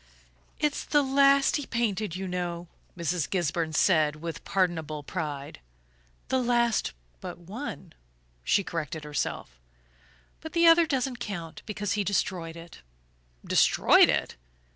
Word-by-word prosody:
"It's 300 Hz, -2 st, 0 dB
the 295 Hz, -1 st, +2 dB
last 275 Hz, 0 st, +4 dB
he 290 Hz, -, -6 dB
painted, 215 Hz, -6 st, -1 dB
you 190 Hz, +1 st, -4 dB
know," 175 Hz, -1 st, -4 dB, 0.3 s
Mrs. 170 Hz, -3 st, -1 dB
Gisburn 165 Hz, -3 st, -1 dB
said 155 Hz, -2 st, +3 dB
with 165 Hz, +1 st, -7 dB
pardonable 160 Hz, -6 st, -1 dB
pride. 145 Hz, -, -5 dB, 0.7 s
"The 260 Hz, 0 st, +2 dB
last 235 Hz, -, +1 dB, 0.3 s
but -, -, -7 dB
one," 190 Hz, -, -8 dB, 0.5 s
she 200 Hz, -, +2 dB
corrected 160 Hz, -3 st, -4 dB
herself 145 Hz, -, -4 dB, 0.8 s
"but 320 Hz, -, -9 dB
the 340 Hz, 0 st, +4 dB
other 330 Hz, 0 st, +7 dB
doesn't 265 Hz, -3 st, -1 dB
count, 170 Hz, -6 st, -6 dB
because 205 Hz, -1 st, -3 dB
he 210 Hz, -1 st, +1 dB
destroyed 180 Hz, -4 st, -1 dB
it." 170 Hz, -, -12 dB, 0.6 s
"Destroyed -, -, +5 dB
it?" -, -, -1 dB
185 Hz, 125 wpm, -27 LUFS, 165-240 Hz, 0.8 s, other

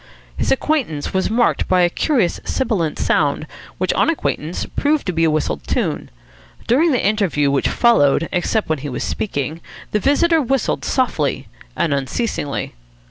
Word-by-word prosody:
His -, -, -1 dB
entrance 270 Hz, -, -1 dB
was 190 Hz, 0 st, +1 dB
marked 235 Hz, +2 st, +1 dB
by 185 Hz, -1 st, +3 dB
a 175 Hz, -, +5 dB
curious 235 Hz, -, +1 dB
sibilant 195 Hz, -, -1 dB
sound, 145 Hz, 0 st, +1 dB, 0.3 s
which, 185 Hz, -, 0 dB
on -, -, +2 dB
acquaintance, 175 Hz, -, -2 dB
proved 295 Hz, +1 st, +1 dB
to 185 Hz, -, -2 dB
be 165 Hz, 0 st, +1 dB
a -, -, +3 dB
whistled 150 Hz, -, -1 dB
tune. -, -, -1 dB, 0.6 s
During 305 Hz, +8 st, +3 dB
the 255 Hz, -, +1 dB
interview 190 Hz, -9 st, +1 dB
which 140 Hz, -, +1 dB
followed, 165 Hz, -, +3 dB
except 195 Hz, +4 st, 0 dB
when 155 Hz, -2 st, -1 dB
he 145 Hz, +2 st, -5 dB
was 125 Hz, -, -4 dB
speaking, 160 Hz, -4 st, -3 dB, 0.3 s
the 210 Hz, -, +1 dB
visitor 320 Hz, -, +3 dB
whistled 270 Hz, -1 st, -1 dB
softly 165 Hz, -, 0 dB, 0.3 s
and 160 Hz, -, 0 dB
unceasingly. 140 Hz, -, -2 dB
185 Hz, 155 wpm, -19 LUFS, 150-255 Hz, 0.6 s, a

